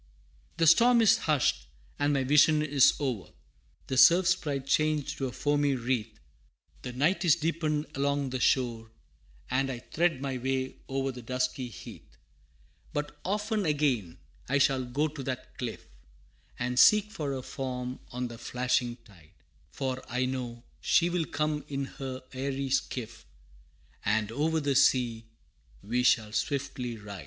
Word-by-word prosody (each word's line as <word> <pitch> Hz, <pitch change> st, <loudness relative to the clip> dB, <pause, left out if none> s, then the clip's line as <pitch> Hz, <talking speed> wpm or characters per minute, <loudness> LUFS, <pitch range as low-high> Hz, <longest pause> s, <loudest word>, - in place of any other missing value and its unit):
VI. -, -, -32 dB
The 165 Hz, -, +3 dB
storm 235 Hz, +8 st, +6 dB
is 215 Hz, -, +6 dB
hushed, 130 Hz, -, +1 dB, 0.3 s
and 145 Hz, 0 st, +2 dB
my 140 Hz, -2 st, +1 dB
vision 150 Hz, +3 st, +5 dB
is 145 Hz, -3 st, +4 dB
o'er, 120 Hz, -, -3 dB, 0.6 s
The 130 Hz, -, -3 dB
Surf 175 Hz, +6 st, +7 dB
Sprite 150 Hz, -7 st, 0 dB
changed 155 Hz, +1 st, 0 dB
to 135 Hz, -, -1 dB
a -, -, -5 dB
foamy 145 Hz, 0 st, +1 dB
wreath, 120 Hz, -3 st, -2 dB, 0.6 s
The 125 Hz, -, -6 dB
night 165 Hz, +9 st, +1 dB
is 170 Hz, -4 st, +5 dB
deepened 155 Hz, -2 st, -1 dB
along 140 Hz, -1 st, -1 dB
the 130 Hz, -, -2 dB
shore, 115 Hz, -3 st, +1 dB, 0.6 s
And 135 Hz, +1 st, +1 dB
I 125 Hz, -, -4 dB
thread 165 Hz, +4 st, 0 dB
my 135 Hz, -2 st, -3 dB
way 130 Hz, +1 st, -2 dB
o'er 135 Hz, 0 st, -1 dB
the 125 Hz, -1 st, -9 dB
dusky 125 Hz, +1 st, -2 dB
heath. 110 Hz, -, -12 dB, 0.8 s
But 150 Hz, 0 st, -3 dB
often 210 Hz, +2 st, -1 dB
again 135 Hz, -, 0 dB, 0.3 s
I 135 Hz, -, +3 dB
shall 135 Hz, -2 st, +2 dB
go 140 Hz, +5 st, 0 dB
to 150 Hz, -1 st, -8 dB
that 130 Hz, -1 st, -5 dB
cliff, 120 Hz, -3 st, -5 dB, 0.7 s
And 125 Hz, +1 st, -1 dB
seek 210 Hz, 0 st, +6 dB
for 150 Hz, -9 st, -3 dB
her 130 Hz, -1 st, -5 dB
form 125 Hz, -2 st, -5 dB
on 125 Hz, 0 st, -3 dB
the 120 Hz, -1 st, -10 dB
flashing 125 Hz, -1 st, -1 dB
tide, 85 Hz, -7 st, -19 dB, 0.4 s
For 130 Hz, -1 st, -4 dB
I 125 Hz, +1 st, 0 dB
know 125 Hz, -2 st, -4 dB, 0.2 s
she 175 Hz, 0 st, +2 dB
will 175 Hz, -2 st, 0 dB
come 150 Hz, 0 st, -2 dB
in 140 Hz, -1 st, -3 dB
her 130 Hz, -1 st, -7 dB
airy 135 Hz, 0 st, -3 dB
skiff, 120 Hz, -4 st, -3 dB, 0.8 s
And 110 Hz, 0 st, 0 dB
over 160 Hz, +6 st, 0 dB
the 145 Hz, -2 st, 0 dB
sea 120 Hz, -4 st, +2 dB, 0.6 s
we 120 Hz, +4 st, 0 dB
shall 115 Hz, -3 st, +3 dB
swiftly 130 Hz, -1 st, -2 dB
ride! 100 Hz, -2 st, -9 dB
135 Hz, 155 wpm, -29 LUFS, 125-150 Hz, 0.8 s, Surf